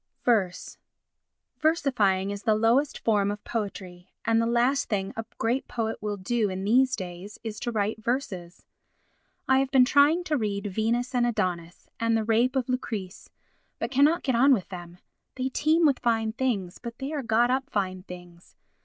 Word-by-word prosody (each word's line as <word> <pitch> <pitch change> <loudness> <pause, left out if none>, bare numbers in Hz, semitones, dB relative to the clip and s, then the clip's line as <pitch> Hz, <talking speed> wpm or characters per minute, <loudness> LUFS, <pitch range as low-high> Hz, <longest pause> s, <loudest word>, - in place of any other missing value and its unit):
Verse 195 -7 0 0.8
Versifying 220 - +1
is 200 0 -5
the 220 -1 +2
lowest 235 +6 +2
form 205 -3 +1
of 205 +1 -5
poetry; 190 -5 -5 0.2
and 225 0 +3
the 230 - 0
last 245 +4 +1
thing 195 -3 -2
a 225 - -3
great 240 +4 -1
poet 225 -2 -3
will 210 -1 -3
do 215 +2 0
in 190 0 -4
these 255 +5 +3
days 185 +1 -8
is 215 -2 -5
to 240 - -3
write 215 0 -2
verses. 195 -9 -3 0.8
I 265 0 +4
have 270 -1 0
been 265 -2 +5
trying 290 +6 +4
to 310 -4 0
read 205 -3 -2
Venus 235 +4 0
and 245 -1 +2
Adonis 175 -6 -3
and 230 0 +2
the 220 - 0
Rape 235 +4 +2
of 260 -3 0
Lucrece 220 -7 -4 0.5
but 235 - -3
cannot 290 +6 +3
get 260 - 0
on 265 +4 +5
with 200 -8 -1
them. 175 -1 -9 0.4
They 260 0 -2
teem 315 +5 +2
with 280 -4 +3
fine 225 -2 0
things, 220 -8 -2
but 235 -1 -8
they 275 +3 -5
are 295 - -2
got 235 0 +2
up 265 +1 -1
fine 185 -4 -2
things. 175 -1 -13
225 Hz, 180 wpm, -26 LUFS, 200-255 Hz, 0.8 s, been